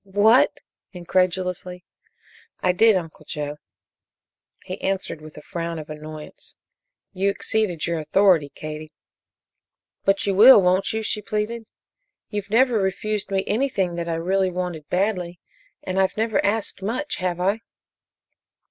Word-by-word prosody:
"What!" 205 +5 +3 0.3
incredulously. 180 0 -1 0.7
"I 185 - +2
did, 220 +4 +5
Uncle 165 -4 -4
Joe." 150 0 -5 1.1
He - - -7
answered 190 -5 -2
with 155 0 -12
a 150 - -10
frown 170 0 -4
of 155 -1 -8
annoyance: 155 0 -9 0.6
"You 195 +1 +1
exceeded 200 -5 0
your 170 -1 -1
authority, 160 -1 +3
Katie." 155 0 -7 1.1
"But 195 0 +2
you 200 - +1
will, 220 +5 +9
won't 185 +1 +2
you?" 220 0 -2
she 210 0 -1
pleaded. 215 +2 -3 0.6
"You've 205 -1 -4
never 235 +1 +3
refused 205 +1 -2
me 195 -1 0
anything 205 -6 0
that 170 0 -4
I 165 - 0
really 185 +3 +1
wanted 175 -4 -5
badly, 180 -3 -1 0.4
and 185 +1 -2
I've 190 +1 +1
never 220 0 +1
asked 205 -1 -1
much, 250 +9 -2
have 180 -1 -2
I?" 195 +4 +1
190 Hz, 135 wpm, -23 LUFS, 170-210 Hz, 1.1 s, will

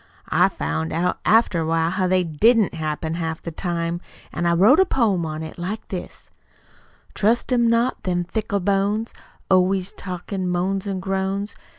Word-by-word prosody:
I - - +4
found 80 +2 -3
out, 180 +2 0
after 220 -5 +4
awhile, 165 +1 +1
how 185 -1 0
they 185 0 +2
DIDN'T 210 +7 +3
happen 160 0 -3
half 160 -1 -3
the 170 - -7
time, 170 0 -3 0.3
an' 175 - -1
I 170 - +3
wrote 210 - +5
a - - +8
poem 205 - +1
on 155 0 -5
it, 160 - -9
like 195 +5 -5
this: 185 -3 -7 0.8
Trust 230 +5 +1
'em 235 -2 +3
not, 230 +2 +1
them 175 -1 -1
fickle 200 +2 -2
bones, 200 +4 0 0.3
Always 185 0 +2
talkin' 185 +1 -4
moans 190 +3 -1
an' 190 -2 -3
groans. 195 +2 -2
185 Hz, 165 wpm, -22 LUFS, 170-205 Hz, 0.8 s, a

